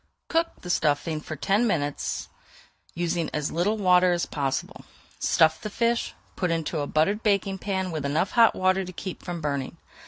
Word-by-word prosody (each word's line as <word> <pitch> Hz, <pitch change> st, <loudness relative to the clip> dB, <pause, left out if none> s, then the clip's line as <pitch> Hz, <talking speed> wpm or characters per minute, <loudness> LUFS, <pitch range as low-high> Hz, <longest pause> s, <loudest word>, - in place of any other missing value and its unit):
Cook 330 Hz, 0 st, 0 dB
the 180 Hz, -, -3 dB
stuffing 155 Hz, 0 st, +1 dB
for 155 Hz, -, -6 dB
ten 205 Hz, +8 st, +2 dB
minutes, 145 Hz, -7 st, -2 dB, 0.7 s
using 170 Hz, -1 st, -1 dB
as 150 Hz, -1 st, -1 dB
little 195 Hz, +6 st, +1 dB
water 180 Hz, -2 st, +4 dB
as 175 Hz, -, 0 dB
possible. 135 Hz, -2 st, -3 dB, 0.4 s
Stuff 160 Hz, -1 st, +3 dB
the 215 Hz, -, -4 dB
fish, 235 Hz, +2 st, 0 dB, 0.2 s
put 180 Hz, -, -1 dB
into 165 Hz, -1 st, -1 dB
a 145 Hz, -, -2 dB
buttered 195 Hz, +9 st, +1 dB
baking 195 Hz, -2 st, +1 dB
pan 190 Hz, -2 st, -2 dB
with 155 Hz, -3 st, -3 dB
enough 150 Hz, +7 st, 0 dB
hot 230 Hz, -2 st, +5 dB
water 185 Hz, +1 st, +2 dB
to 185 Hz, 0 st, -8 dB
keep 185 Hz, +1 st, -6 dB
from 175 Hz, -2 st, -5 dB
burning. 140 Hz, +1 st, -3 dB
175 Hz, 175 wpm, -26 LUFS, 155-195 Hz, 0.7 s, hot